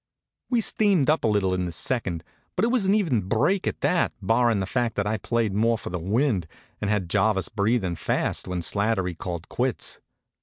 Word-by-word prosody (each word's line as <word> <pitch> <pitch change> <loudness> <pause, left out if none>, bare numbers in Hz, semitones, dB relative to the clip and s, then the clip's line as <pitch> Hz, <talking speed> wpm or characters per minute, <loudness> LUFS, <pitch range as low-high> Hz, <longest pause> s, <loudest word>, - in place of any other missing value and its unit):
We 240 -3 +2
steamed 195 -10 +3
up 155 - 0
a - - +3
little 100 -3 +2
in 90 0 -1
the 85 - -4
second; 90 -2 -1 0.3
but 190 - +2
it - - +1
was 240 -5 +1
an 195 +2 +4
even 160 - +2
break 115 - +1
at - - -3
that, 180 - +2
barrin' 115 +2 +2
the 95 - -1
fact 120 +3 -1
that 100 - 0
I 110 +1 0
played 115 -3 -1
more 115 +3 +2
for - - -7
the 90 - -2
wind, 100 - 0 0.3
and 105 - -1
had 105 -4 0
Jarvis 95 0 +1
breathin' 100 -3 0
fast - - -1
when 90 -1 -2
Slattery 100 -3 0
called 85 0 -5
quits. 125 -1 -2
110 Hz, 200 wpm, -25 LUFS, 95-125 Hz, 0.3 s, an